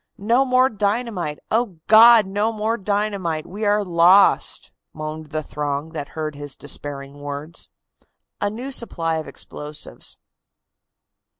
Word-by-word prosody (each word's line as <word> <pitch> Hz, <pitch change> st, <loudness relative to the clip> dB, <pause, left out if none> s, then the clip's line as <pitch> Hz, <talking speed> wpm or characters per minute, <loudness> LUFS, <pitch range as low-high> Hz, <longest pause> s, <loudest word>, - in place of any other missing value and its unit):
"No 235 Hz, +6 st, +2 dB
more 255 Hz, 0 st, +4 dB
dynamite! 205 Hz, -, -2 dB
O 225 Hz, -6 st, 0 dB
God! 225 Hz, 0 st, +8 dB
no 205 Hz, +3 st, 0 dB
more 220 Hz, +1 st, -1 dB
dynamite! 200 Hz, -6 st, -2 dB
We 205 Hz, +4 st, -5 dB
are 205 Hz, 0 st, +2 dB
lost!" 180 Hz, +3 st, +4 dB, 0.2 s
moaned 155 Hz, 0 st, -6 dB
the 155 Hz, +1 st, -3 dB
throng 145 Hz, +1 st, -3 dB
that 145 Hz, -3 st, -6 dB
heard 155 Hz, -1 st, -2 dB
his 145 Hz, -1 st, -6 dB
despairing 145 Hz, 0 st, -3 dB
words. 145 Hz, +3 st, -6 dB, 0.7 s
A 205 Hz, -, +1 dB
NEW 245 Hz, +6 st, -6 dB
SUPPLY 165 Hz, -10 st, -1 dB
OF 160 Hz, -, -5 dB
EXPLOSIVES. 150 Hz, 0 st, -6 dB
185 Hz, 125 wpm, -22 LUFS, 155-215 Hz, 0.7 s, God